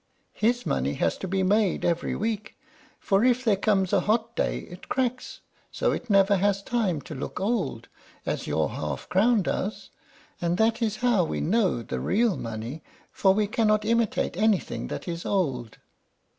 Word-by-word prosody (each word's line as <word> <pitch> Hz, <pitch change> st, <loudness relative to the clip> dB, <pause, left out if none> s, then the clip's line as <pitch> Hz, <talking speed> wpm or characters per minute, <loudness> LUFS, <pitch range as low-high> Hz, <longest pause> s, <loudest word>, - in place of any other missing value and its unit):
His 240 Hz, +3 st, +1 dB
money 70 Hz, +2 st, 0 dB
has 85 Hz, -, +1 dB
to 190 Hz, -, -4 dB
be 190 Hz, +1 st, 0 dB
made 200 Hz, 0 st, +2 dB
every 170 Hz, 0 st, 0 dB
week, 220 Hz, 0 st, -3 dB, 0.4 s
for 195 Hz, +1 st, +2 dB
if 255 Hz, 0 st, +2 dB
there 215 Hz, -3 st, +4 dB
comes 195 Hz, -2 st, +1 dB
a -, -, +5 dB
hot 225 Hz, +2 st, 0 dB
day -, -, 0 dB
it 175 Hz, +1 st, -12 dB
cracks, 255 Hz, -1 st, -2 dB, 0.3 s
so -, -, 0 dB
it 245 Hz, -, -4 dB
never 195 Hz, 0 st, +5 dB
has 200 Hz, +1 st, +1 dB
time 205 Hz, -, 0 dB
to 155 Hz, -, -9 dB
look 140 Hz, +4 st, -5 dB
old, 225 Hz, +5 st, -1 dB, 0.4 s
as -, -, -3 dB
your -, -, 0 dB
half -, -, -4 dB
crown 215 Hz, +2 st, +3 dB
does; 205 Hz, +4 st, -3 dB, 0.5 s
and 175 Hz, 0 st, 0 dB
that 225 Hz, +2 st, +2 dB
is 220 Hz, -2 st, 0 dB
how 225 Hz, -7 st, +4 dB
we 160 Hz, -, -2 dB
know 185 Hz, -, +1 dB
the -, -, -4 dB
real 220 Hz, -1 st, +2 dB
money, 115 Hz, +6 st, -6 dB, 0.3 s
for 190 Hz, -1 st, +3 dB
we 215 Hz, 0 st, +2 dB
cannot 215 Hz, 0 st, +1 dB
imitate 230 Hz, -4 st, +1 dB
anything 210 Hz, 0 st, 0 dB
that -, -, -6 dB
is 170 Hz, -1 st, -4 dB
old. 130 Hz, -, -1 dB
200 Hz, 170 wpm, -26 LUFS, 180-225 Hz, 0.5 s, a